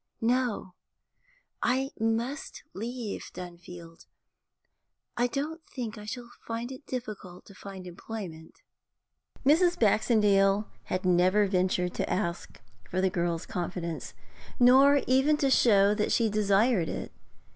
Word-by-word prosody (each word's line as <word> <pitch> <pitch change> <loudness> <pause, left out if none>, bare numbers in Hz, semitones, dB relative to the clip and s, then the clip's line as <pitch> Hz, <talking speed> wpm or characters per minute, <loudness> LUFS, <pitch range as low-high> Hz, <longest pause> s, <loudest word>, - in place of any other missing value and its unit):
'No; 235 -5 0 0.9
I 265 +2 +1
must 230 +6 -2
leave 230 0 -5
Dunfield. 175 -1 -10 1.1
I 245 0 +2
don't 305 +6 -4
think 235 -5 -5
I 210 -1 -10
shall 240 +2 -7 0.2
find 230 +2 -4
it 265 +2 -10
difficult 210 -8 -7
to 200 - -14
get 190 -1 -9
employment.' 175 -3 -8 0.8
Mrs. 345 +5 +4
Baxendale 210 -2 +3 0.2
had 185 0 -3
never 185 +3 +4
ventured 185 -2 0
to - - -2
ask 170 -3 -3 0.3
for 185 - -1
the 190 0 +2
girl's 170 -1 -1
confidence, 175 -4 -5 0.4
nor 270 +3 +6
even 270 +4 +3
to 275 -3 +1
show 205 -5 +5
that 210 0 -1
she 225 -3 +2
desired 205 -2 +2
it. - - -5
210 Hz, 120 wpm, -28 LUFS, 185-245 Hz, 1.1 s, nor